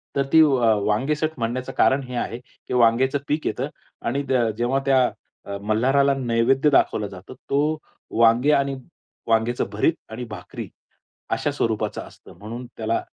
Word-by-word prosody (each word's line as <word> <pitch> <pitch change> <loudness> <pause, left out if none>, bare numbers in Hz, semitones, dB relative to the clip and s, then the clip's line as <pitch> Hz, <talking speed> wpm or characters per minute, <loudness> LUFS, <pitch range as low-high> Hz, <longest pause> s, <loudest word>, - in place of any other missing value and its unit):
तर 140 - +2
ती 160 - +8
अ, 125 -7 +4
वांगेसट 150 +9 0
म्हणण्याचं 120 +3 -2
कारण 135 +1 +3
हे 125 -1 -7
आहे 120 0 -3
की, 125 - -11
वांगेचं 125 +3 +3
पीक 150 +1 -1
येतं 110 - -2 0.4
आणि 140 +4 0
द 120 -4 +2
जेव्हा 120 +3 +1
त्या 135 -1 +4 0.4
अ, 100 - -5
मल्हाराला 130 +7 +2
नैवेद्य 130 +3 +2
दाखवलं 110 -6 +2
जातं, 95 +4 -11 0.2
तो 150 +3 +1 0.4
वांगे 115 +5 +5
आणि 140 -1 +2 0.5
वांग्याचं 115 +2 +1
भरीत 110 +10 +2 0.2
आणि 125 +3 -5
भाकरी - - -7 0.7
अशा - - -1
स्वरूपाचा 110 -2 -1
असतं - - -16
म्हणून 115 +4 -7
त्याला 115 0 -1
125 Hz, 150 wpm, -23 LUFS, 115-140 Hz, 0.7 s, ती